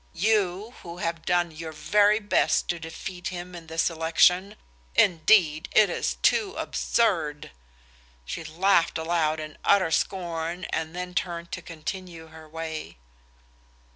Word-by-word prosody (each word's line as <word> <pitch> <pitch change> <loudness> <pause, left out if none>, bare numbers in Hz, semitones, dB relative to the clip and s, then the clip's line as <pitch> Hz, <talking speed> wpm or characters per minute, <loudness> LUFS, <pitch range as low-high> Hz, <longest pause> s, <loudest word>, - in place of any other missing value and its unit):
You, 205 +2 +1
who 170 0 -9
have 165 -1 -3
done 175 -1 +2
your 160 +1 -7
very 205 +6 +3
best 205 -2 +1
to 175 - -1
defeat 175 +2 -7
him 180 0 -6
in 170 -2 -10
this 160 +1 0
election? 170 +4 +3 0.4
Indeed, 165 -3 +4
it 210 -4 +5
is - - -1
too 410 -4 +2
absurd!" 165 - 0 0.7
She 165 - -5
laughed 170 +2 +2
aloud 160 -1 0
in 155 -1 -8
utter 190 -5 +3
scorn, 170 0 -2
and 160 +1 -3
then 180 0 -5
turned 170 -1 -3
to - - -5
continue 165 0 -7
her 160 0 -13
way. 160 - -6
170 Hz, 135 wpm, -26 LUFS, 160-185 Hz, 0.7 s, it